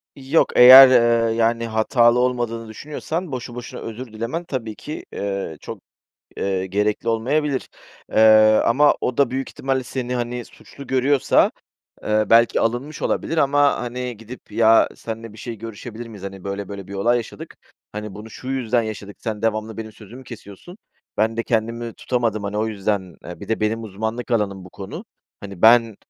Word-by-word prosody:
Yok, 140 +4 +1
eğer, 130 +2 +11
eee, 115 -2 +3
yani, 115 0 +1
hatalı 115 +2 +3
olmadığını 120 -2 -1
düşünüyorsan 150 - -5
boşu 125 -1 -6
boşuna 120 -1 -8
özür 115 +3 -7
dilemen 115 +10 -4
tabii 115 -8 -5
ki, 150 - -8
eee, 100 -5 -4
çok, - - -8 0.6
eee, 95 -1 -2
gerekli 105 +4 -1
olmayabilir, 135 +5 0 0.4
eee, 110 0 +6
ama 145 +5 +4
o 125 - -2
da 140 -3 +3
büyük 135 +1 -3
ihtimalle 135 -1 -2
seni, 125 0 -4
hani, 120 0 -3
suçlu 140 +4 -14
görüyorsa, 130 +1 +2 0.5
eee, 110 0 +1
belki 115 +1 +5
alınmış 120 +7 -2
olabilir 165 - -1
ama, 145 0 +3
hani, 125 0 -5
gidip 115 +1 -12
"Ya, 115 +1 +5
senle 115 -1 -7
bir 110 - -15
şey 115 0 -7
görüşebilir 115 +2 -8
miyiz? 105 -4 -11
Hani, 95 -1 -8
böyle 100 0 -5
böyle 100 -2 -8
bir 100 - -9
olay 115 +5 +2
yaşadık. 115 -2 -7 0.4
Hani, 105 -1 -6
bunu, 110 +2 -10
şu 130 - -10
yüzden 125 -3 0
yaşadık. 105 -2 -7
Sen 110 -2 -5
devamlı 110 -1 -2
benim 110 -1 -7
sözümü 115 +6 -13
kesiyorsun. 115 - -12 0.4
Ben 110 +1 +1
de 115 - 0
kendimi 115 0 -2
tutamadım, 115 -4 -2
hani, 100 +1 -3
o 110 - 0
yüzden, 100 -4 -3
eee, 90 +3 -9
bir 100 - -9
de 115 - -1
benim 110 +1 -1
uzmanlık 110 +4 -5
alanım 100 -5 -1
bu 95 - -13
konu. 95 +1 -8 0.4
Hani, 100 -3 -10
ben, 115 -1 +5
115 Hz, 170 wpm, -21 LUFS, 105-125 Hz, 0.6 s, eğer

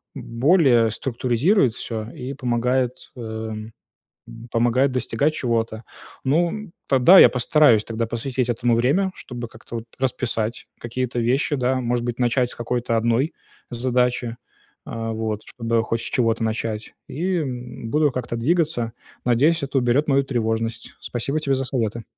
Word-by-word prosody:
б - - -7
более 120 -3 +4
структуризирует 125 - +1
всё 110 -1 -5
и 130 +2 -6
помогает, 125 -1 -1
э, - - -9
м, 110 -1 -6 0.8
помогает 120 +4 +2
достигать 140 +4 0
чего-то. 115 -4 -1 0.4
Ну, 165 +6 +2
м, 215 -3 -7 0.2
тогда 140 +9 +7
я - - +10
постараюсь 125 -3 +4
тогда 115 0 -2
посвятить 125 +2 -2
этому 120 0 +2
времени, 155 +12 +2
чтобы 120 -2 -7
как-то 115 +1 -11
вот 115 - -7
расписать 120 -3 -2
какие-то 120 +1 -3
вещи 130 +5 +1
да, 130 0 0
может 120 0 -1
быть, 120 +1 -3
начать 125 0 +1
с - - -9
какой-то 120 0 -1
одной 115 +7 +1 0.4
задачи, 125 -1 0 0.5
э, 115 0 -4
вот 110 -1 -3
чтобы 115 -1 -1
хоть 115 +1 -1
с - - -5
чего-то 115 -2 +1
начать, 110 -1 -3
и, 180 +4 -1
м, 125 -5 -5
буду 150 -2 +3
как-то 120 -2 -4
двигаться. 145 -4 0 0.3
Надеюсь, 140 +7 +3
это 135 0 -1
уберет 125 +5 +2
мою 140 -1 +3
тревожность. 115 -3 -2
Спасибо 135 +5 -2
тебе 140 -3 0
за 135 - -2
советы. 115 -3 -2
120 Hz, 150 wpm, -22 LUFS, 115-135 Hz, 0.8 s, я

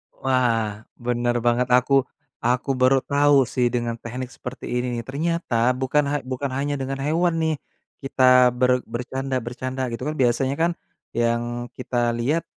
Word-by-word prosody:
Wah, 115 -5 0 0.2
benar 120 0 0
banget 120 +1 +2
aku 125 +2 0 0.5
aku 125 +3 +1
baru 130 +1 +5
tahu 145 0 +4 0.2
sih 125 -2 +2
dengan 120 -1 -1
tehnik 125 +2 -5
seperti 125 +1 -8
ini 125 -1 -2
ternyata 165 0 -2 0.3
bukan 145 +3 +2
ha 145 - 0 0.2
bukan 130 +1 -2
hanya 145 +1 -1
dengan 135 +1 -3
hewan 170 +3 +2
nih, 160 -1 +1 0.5
kita 135 -1 0 0.4
ber 125 0 +4 0.2
bercanda-bercanda 130 0 -3
gitu 115 - -5
kan 155 - -2
biasanya 130 +3 +2
kan 170 +1 +3 0.5
yang 120 +1 0
kita 125 -1 -4 0.2
lihat, 150 +8 +1
130 Hz, 145 wpm, -23 LUFS, 120-140 Hz, 0.5 s, baru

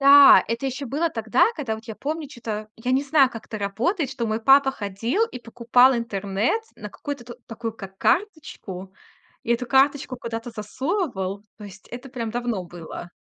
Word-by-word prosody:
Да, 280 0 +9
это 230 +4 -2
ещё 265 +2 -4
было 300 +7 0
тогда, 230 - +2
когда 260 -8 -2
вот 220 +1 -10
я 225 - -7
помню 305 +5 -4
чё-то, 220 -5 -6
я 245 +3 -3
не 270 - +3
знаю, 280 -2 +4
как 225 -3 -9
это 215 - -6
работает, 255 - -1
что 250 -4 -3
мой 220 +1 -1
папа 270 +3 +6
ходил 230 - -1
и 350 - -8
покупал 245 +2 +4
интернет 205 - -1 0.2
на 210 - -7
какую-то 245 0 -7
такую, 225 0 -5
как 195 -3 -10
карточку, 210 - -2 0.5
и 235 - +1
эту 245 +1 -1
карточку 270 0 +2
куда-то 230 0 -5
засовывал. 210 - -3
То 210 - -9
есть 205 +1 -13
это 250 +3 -8
прям 240 -4 -4
давно 235 -5 -2
было. 175 0 -9
235 Hz, 175 wpm, -24 LUFS, 215-275 Hz, 0.5 s, Да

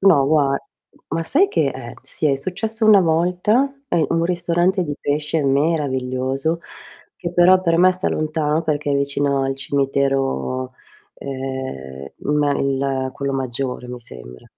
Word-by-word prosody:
no, 170 -9 +5
gua 140 -2 +3 0.5
ma 165 - -1
sai 335 - +3
che 410 - +1
eh - - -7
sì, 155 - -1
è 140 -2 +2
successo 215 - -2
1 210 -2 +8
volta, 180 +10 +2 0.2
a - - 0
in 160 - +2
un 165 - +1
ristorante 175 +1 +1
di 150 - -3
pesce 150 +2 -1
meraviglioso 135 0 0 0.6
che 175 -2 -5
però 180 +1 +6
per 165 -1 +2
me 185 +1 +6
sta 185 +1 -2
lontano 155 0 0
perché 150 -2 -1
è 140 - +2
vicino 140 0 0
al 135 0 -1
cimitero, 135 - -1 0.4
ehm, 130 - -6 0.3
ma 145 -1 +2
il 135 -1 -1
quello 140 0 -3
maggiore 130 -1 -3
mi 125 0 -7
sembra. 60 - -11
145 Hz, 150 wpm, -20 LUFS, 135-170 Hz, 0.6 s, 1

